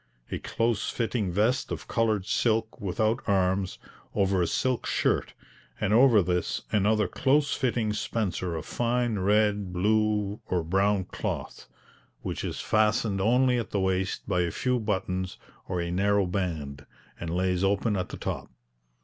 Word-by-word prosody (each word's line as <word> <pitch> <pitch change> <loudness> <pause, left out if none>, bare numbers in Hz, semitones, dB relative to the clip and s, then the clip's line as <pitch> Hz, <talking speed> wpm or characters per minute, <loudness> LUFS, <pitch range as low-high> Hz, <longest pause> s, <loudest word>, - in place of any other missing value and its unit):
A - - -2
close 115 -1 -1
fitting 115 -5 -1
vest 110 +7 +1
of - - -5
coloured 110 -4 +1
silk 110 +1 0
without 110 +5 0
arms, 95 -1 +1 0.4
over 95 -2 +2
a 85 - +2
silk 130 +8 0
shirt, - - 0 0.4
and 105 0 +1
over 115 -4 +6
this 90 0 -1
another 105 0 +2
close 140 +8 +2
fitting 120 -5 0
spencer 105 -5 -2
of 80 -1 -5
fine 120 -2 0
red, 105 0 +2
blue, 105 +2 +1
or 90 -2 0
brown 95 +3 +2
cloth, - - -5 0.6
which - - -4
is - - -4
fastened 105 -2 +2
only 125 +4 +3
at 115 - -4
the 100 - -1
waist 95 0 -1
by 90 -3 +1
a 85 - 0
few 125 +8 0
buttons 95 -4 -2 0.3
or 90 -2 -2
a 85 0 -2
narrow 100 +2 +2
band, 80 -7 -3 0.3
and 85 - -4
lays 90 +1 0
open 100 +2 +1
at 90 -1 -2
the - - -7
top. - - -4
100 Hz, 150 wpm, -27 LUFS, 95-110 Hz, 0.6 s, over